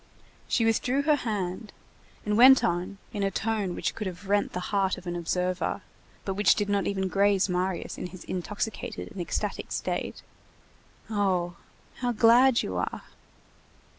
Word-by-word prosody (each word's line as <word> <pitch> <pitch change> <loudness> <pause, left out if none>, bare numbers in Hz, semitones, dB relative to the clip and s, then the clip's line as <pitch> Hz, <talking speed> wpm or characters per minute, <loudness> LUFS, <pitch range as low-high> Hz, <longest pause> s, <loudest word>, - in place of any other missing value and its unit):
She 230 - +2
withdrew 250 +5 +1
her 305 +1 +4
hand 210 -3 -3 0.5
and 210 0 +1
went 260 +3 +8
on, 180 +3 -1 0.2
in 205 - -3
a 195 - +2
tone 210 -3 -1
which - - -2
could 215 - -4
have 185 +2 -8
rent 205 +1 +1
the - - -2
heart 195 -2 +2
of - - -11
an 175 0 -3
observer, 180 +2 -1 0.4
but 195 - -1
which 205 0 +4
did 205 - -1
not 200 -1 +1
even 190 -1 -1
graze 200 0 +3
Marius 180 0 -2
in - - -4
his 180 -1 -11
intoxicated 210 +6 -4
and 200 -5 -6
ecstatic 175 - -3
state:— - - -3 0.9
"Oh! 185 -4 0 0.4
how 245 -1 -1
glad 235 +3 +5
you 95 - -3
are!" 90 - -3
200 Hz, 160 wpm, -27 LUFS, 180-220 Hz, 0.9 s, went